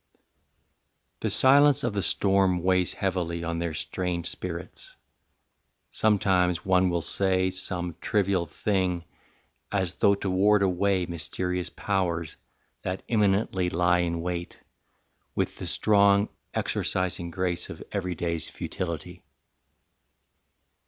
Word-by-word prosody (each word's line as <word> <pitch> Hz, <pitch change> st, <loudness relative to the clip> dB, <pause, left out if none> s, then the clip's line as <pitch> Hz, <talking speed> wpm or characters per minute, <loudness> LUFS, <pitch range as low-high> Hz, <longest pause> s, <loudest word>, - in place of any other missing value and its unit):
VII. -, -, -42 dB, 1.0 s
The -, -, -1 dB
silence 140 Hz, +2 st, +6 dB
of 120 Hz, -, -1 dB
the 100 Hz, -, -1 dB
storm 95 Hz, -3 st, +2 dB
weighs 90 Hz, -1 st, +2 dB
heavily 85 Hz, -3 st, -2 dB
On 85 Hz, 0 st, -2 dB
their 85 Hz, -2 st, -3 dB
strained 90 Hz, 0 st, -3 dB
spirits: 85 Hz, -1 st, -6 dB, 1.0 s
sometimes 90 Hz, -5 st, +2 dB
one 95 Hz, -1 st, +3 dB
will 85 Hz, -2 st, -1 dB
say 95 Hz, -1 st, +1 dB
Some 90 Hz, -2 st, 0 dB
trivial 95 Hz, -5 st, 0 dB
thing 90 Hz, -4 st, -1 dB, 0.7 s
as 95 Hz, -3 st, 0 dB
though 100 Hz, 0 st, +4 dB
to 100 Hz, -, -5 dB
ward 100 Hz, +2 st, +3 dB
away 95 Hz, 0 st, +1 dB
Mysterious 90 Hz, +2 st, -2 dB
powers, 85 Hz, -5 st, -2 dB, 0.5 s
that 90 Hz, +1 st, -4 dB
imminently 100 Hz, -4 st, +1 dB
lie 90 Hz, +1 st, +2 dB
In 85 Hz, -1 st, -1 dB
wait, 85 Hz, 0 st, -5 dB, 0.8 s
with -, -, -1 dB
the -, -, -5 dB
strong 100 Hz, 0 st, +3 dB, 0.3 s
exorcising 90 Hz, -2 st, -1 dB
grace 90 Hz, 0 st, -2 dB
Of -, -, -8 dB
everyday's 85 Hz, -4 st, -2 dB
futility. 90 Hz, 0 st, -6 dB
90 Hz, 110 wpm, -26 LUFS, 85-100 Hz, 1.0 s, silence